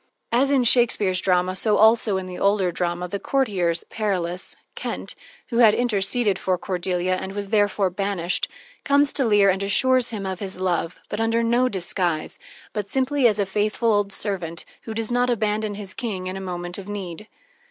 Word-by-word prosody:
As 260 +4 +3
in 275 -3 +3
Shakespeare's 225 -6 +3
drama, 185 0 +1
so 210 +2 +2
also 220 -2 +4
in 190 - -4
the 180 -1 -7
older 200 -2 +2
drama, 175 +1 -2
the 200 +3 -4
courtiers, 190 -12 0
Perillus 185 -4 -2 0.2
Kent - - -5 0.4
who 235 - -2
had 220 -3 +7
interceded 210 -3 +1
for 185 -1 0
Cordelia 180 -1 -1
and 190 +1 -6
was 200 0 -5
therefore 205 -3 +2
banished 190 -2 -1 0.4
comes 285 0 +4
to 270 - +2
Leir 205 -3 +5
and 190 +1 -2
assures 250 +5 +2
him 210 -4 -5
of 190 -1 -4
his 190 -2 -5
love, 180 -2 -1
but 210 - -3
under 225 +1 +1
no 240 +2 +2
disguise, 175 -4 -2 0.3
but 205 -2 -3
simply 265 0 +2
as 215 -3 +2
a 200 - +1
faithful 215 +3 +1
old 205 -1 +1
servant 175 -6 -3 0.2
who 220 - -5
does 225 +1 -3
not 245 +1 +2
abandon 215 -2 0
his 200 -2 -7
king 205 -7 -4
in 185 +1 -4
a 195 - -5
moment 175 0 -5
of 195 - -9
need. 200 -1 -6
200 Hz, 185 wpm, -23 LUFS, 185-225 Hz, 0.4 s, had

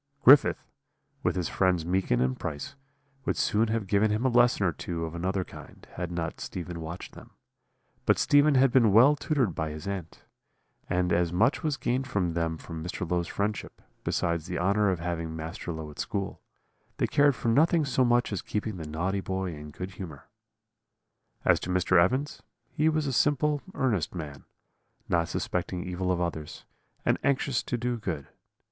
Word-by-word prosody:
"Griffith, 140 +3 +7 0.6
with - - 0
his 90 -2 -1
friends 90 -4 +1
Meekin 90 -9 +1
and 65 0 0
Price, 75 - -5 0.5
would - - -1
soon 110 +2 +2
have 110 -1 -1
given 100 +3 +2
him 105 +4 0
a - - +5
lesson 120 -4 +4
or 90 - +3
two 85 +2 -4
of 80 - -6
another 95 +2 -1
kind, - - -13
had 90 -1 -4
not 85 -2 -4
Stephen 85 -1 -5
watched 85 +3 -7
them; - - -13 0.8
but - - +5
Stephen 145 0 +4
had 130 0 +5
been 120 -5 +5
well 130 +7 +7
tutored 140 - 0
by 80 0 -2
his 75 +3 -7
aunt, 95 -4 -5 0.7
and 90 -1 +1
as 85 -1 +2
much 110 +10 +2
was 150 -3 -1
gained 130 +2 -1
them 85 -8 -1
from 80 0 -7
Mr. 90 +1 -4
Low's 85 0 0
friendship, 105 0 -3 0.2
besides 85 -1 -1
the 90 - -3
honour 100 +3 +2
of 95 - +1
having 85 -2 -3
Master 80 +2 -5
Low 80 -2 -6
at 75 - -14
school, 100 -2 -3 0.6
they - - +2
cared 145 -2 +3
for 115 - -1
nothing 155 +6 +4
so 130 -1 +2
much 120 -2 +2
as 100 - -2
keeping 105 -1 -3
the 80 -3 -6
naughty 95 +6 -1
boy 95 -2 -3
in 75 0 -9
good 90 +5 -7
humour. 80 -9 -9 1.2
"As - - +5
to - - -6
Mr. 90 -1 +4
Evans, 130 - -1 0.3
he 155 +2 +2
was 155 -1 0
a 135 - -1
simple, 145 +2 +2
earnest 105 - 0
man, 75 -5 -7 0.6
not 85 -1 +1
suspecting 90 0 -2
evil 90 0 -2
of 90 - 0
others, 80 -3 -4 0.4
and - - +2
anxious 140 -2 +1
to 120 - -3
do 120 +1 -1
good. 80 -10 -4
95 Hz, 180 wpm, -28 LUFS, 85-120 Hz, 1.2 s, Griffith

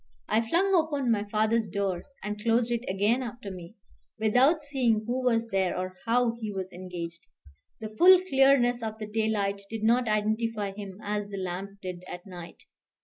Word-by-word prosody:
I 220 +1 +2
flung 350 +12 +1
open 295 -7 +2
my 210 -2 +1
father's 220 +1 +1
door, 195 -1 -2 0.2
and 210 +1 -4
closed 230 +1 +2
it 235 0 -1
again 205 +6 +1
after 235 -4 -6
me, 180 +2 -10 0.4
without 255 +9 +3
seeing 250 -7 +1
who 250 +3 -2
was 230 -2 +1
there 190 -3 0
or 185 0 -4
how 235 0 +2
he 215 -2 -4
was 190 -1 -5
engaged. 175 -2 -7 0.5
The 215 -1 -7
full 370 +1 +9
clearness 270 -7 +3
of 220 -1 -4
the 215 - -5
daylight 210 -2 -1
did 225 -1 -5
not 235 +2 +3
identify 215 0 0
him 195 -1 -8
as 205 0 -2
the 200 -1 -7
lamp 190 +2 -5
did 180 -1 -6
at 180 -1 -8
night. 175 -3 -10
215 Hz, 175 wpm, -28 LUFS, 195-240 Hz, 0.5 s, full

